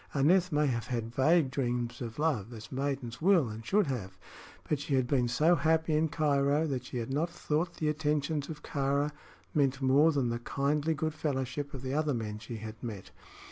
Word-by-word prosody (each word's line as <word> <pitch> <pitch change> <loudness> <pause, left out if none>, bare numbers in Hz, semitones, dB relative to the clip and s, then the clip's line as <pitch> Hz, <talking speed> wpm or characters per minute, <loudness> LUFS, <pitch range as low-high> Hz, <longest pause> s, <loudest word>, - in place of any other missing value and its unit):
Aneth 175 +6 +4
may 150 0 +2
have 120 -4 -1
had 115 -2 -3
vague 145 +1 +3
dreams 120 -2 -2
of 115 -2 -5
love, 135 -9 0
as 110 -1 -10
maidens 135 -3 -3
will 175 -6 +4
and 110 +1 -7
should 205 - +2
have; 120 -10 -4 0.5
but 150 - 0
she 145 -1 -1
had 130 -1 +2
been 125 -2 +1
so 155 +8 +3
happy 160 -1 +2
in 155 +1 +3
Cairo 145 0 +2
that 130 -5 -3
she 125 - -5
had 120 +2 -3
not 160 +5 0
thought 170 0 -2
the 155 - -2
attentions 150 -1 0
of 150 -2 -7
Kāra 140 +1 0 0.4
meant 140 -2 +2
more 140 +4 +5
than 135 -5 0
the 120 0 -2
kindly 145 +5 0
good 155 +2 -2
fellowship 140 -2 -3
of 130 - -7
the 130 0 -3
other 150 -2 +1
men 105 -2 -4
she 115 +2 -7
had 110 0 -8
met. 105 -6 -7
140 Hz, 200 wpm, -31 LUFS, 125-155 Hz, 0.5 s, more